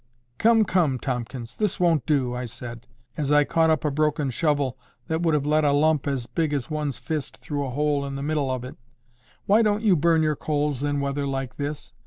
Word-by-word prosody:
"Come, 225 Hz, -1 st, +5 dB
come, 165 Hz, -9 st, +2 dB
Tomkins! 125 Hz, -1 st, -4 dB
this 210 Hz, -2 st, -1 dB
won't 165 Hz, -7 st, +2 dB
do," 135 Hz, -5 st, +1 dB
I 125 Hz, 0 st, -3 dB
said, 120 Hz, 0 st, -8 dB, 0.3 s
as 145 Hz, -2 st, -1 dB
I 150 Hz, 0 st, +6 dB
caught 160 Hz, +2 st, +2 dB
up 155 Hz, -1 st, +1 dB
a 150 Hz, -, +1 dB
broken 150 Hz, -1 st, 0 dB
shovel 140 Hz, -2 st, 0 dB, 0.3 s
that 160 Hz, +1 st, -1 dB
would 165 Hz, -3 st, +2 dB
have 145 Hz, -1 st, 0 dB
let 155 Hz, +1 st, +2 dB
a 145 Hz, -, +3 dB
lump 150 Hz, 0 st, +2 dB
as 135 Hz, -4 st, -1 dB
big 155 Hz, +3 st, -1 dB
as 135 Hz, -2 st, -3 dB
one's 150 Hz, -3 st, -2 dB
fist 155 Hz, -4 st, -4 dB
through 145 Hz, -1 st, -3 dB
a 135 Hz, -, -3 dB
hole 145 Hz, +2 st, 0 dB
in 140 Hz, -, -5 dB
the 140 Hz, -, -4 dB
middle 150 Hz, -2 st, 0 dB
of 130 Hz, -1 st, -2 dB
it. 130 Hz, -, -9 dB, 0.7 s
"Why 210 Hz, +3 st, +5 dB
don't 210 Hz, 0 st, +1 dB
you 205 Hz, -5 st, +5 dB
burn 165 Hz, 0 st, +3 dB
your 155 Hz, -1 st, +1 dB
coals 145 Hz, -2 st, -1 dB
in 145 Hz, -1 st, 0 dB
weather 140 Hz, 0 st, -1 dB
like 135 Hz, -2 st, -4 dB
this? 145 Hz, +1 st, -5 dB
145 Hz, 220 wpm, -25 LUFS, 135-155 Hz, 0.7 s, I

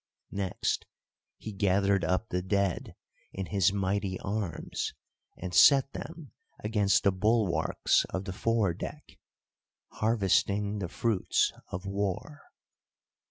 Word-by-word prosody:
Next 95 Hz, -2 st, -2 dB, 0.5 s
he 110 Hz, -, -7 dB
gathered 100 Hz, 0 st, +2 dB
up 95 Hz, +5 st, 0 dB
the 90 Hz, -, -1 dB
dead 100 Hz, -1 st, -1 dB, 0.4 s
in 95 Hz, -, -4 dB
his 95 Hz, -1 st, +2 dB
mighty 100 Hz, -1 st, -1 dB
arms, 100 Hz, -3 st, -3 dB, 0.4 s
and 90 Hz, 0 st, -6 dB
set 135 Hz, -, +6 dB
them 165 Hz, -3 st, -8 dB, 0.3 s
against 105 Hz, -2 st, +2 dB
the 100 Hz, -, +4 dB
bulwarks 105 Hz, -1 st, +2 dB
of 95 Hz, +1 st, -4 dB
the 95 Hz, -, -4 dB
fore 110 Hz, -3 st, +1 dB
deck—harvesting 105 Hz, +2 st, -2 dB
the 90 Hz, -4 st, -3 dB
fruits 110 Hz, 0 st, +1 dB
of 90 Hz, +2 st, -6 dB
War. 100 Hz, -, -3 dB
100 Hz, 110 wpm, -29 LUFS, 95-110 Hz, 0.5 s, set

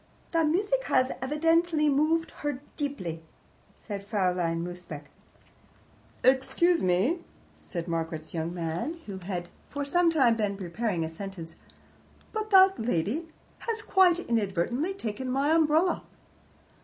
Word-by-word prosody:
"The 330 Hz, -1 st, +3 dB
music 410 Hz, +11 st, +1 dB
has 255 Hz, 0 st, +2 dB
evidently 320 Hz, +3 st, +2 dB
moved 310 Hz, +3 st, +2 dB
her 290 Hz, -3 st, -2 dB, 0.2 s
deeply," 190 Hz, -, -4 dB, 0.6 s
said 200 Hz, -3 st, -6 dB
Fraulein 180 Hz, -5 st, 0 dB
Mosebach. 175 Hz, -4 st, -6 dB, 1.2 s
"Excuse 270 Hz, +7 st, +3 dB
me," 190 Hz, -, +2 dB, 0.4 s
said 170 Hz, -2 st, -6 dB
Margaret's 165 Hz, -2 st, -3 dB
young 165 Hz, 0 st, -2 dB
man, 175 Hz, -, -3 dB
who 195 Hz, -2 st, -6 dB
had 175 Hz, -1 st, -4 dB, 0.2 s
for 285 Hz, -1 st, -3 dB
some 350 Hz, +4 st, +3 dB
time 260 Hz, -8 st, +4 dB
been 205 Hz, -3 st, -1 dB
preparing 185 Hz, -1 st, -2 dB
a -, -, -3 dB
sentence, 165 Hz, -1 st, -8 dB, 0.8 s
"but 435 Hz, -1 st, -2 dB
that 385 Hz, -1 st, +6 dB
lady 225 Hz, -, -1 dB, 0.3 s
has, 450 Hz, -2 st, -3 dB
quite 370 Hz, -3 st, +5 dB
inadvertently, 235 Hz, -, -1 dB
taken 245 Hz, -, -4 dB
my 275 Hz, +4 st, +1 dB
umbrella." 320 Hz, +2 st, +3 dB
250 Hz, 120 wpm, -28 LUFS, -, 1.2 s, that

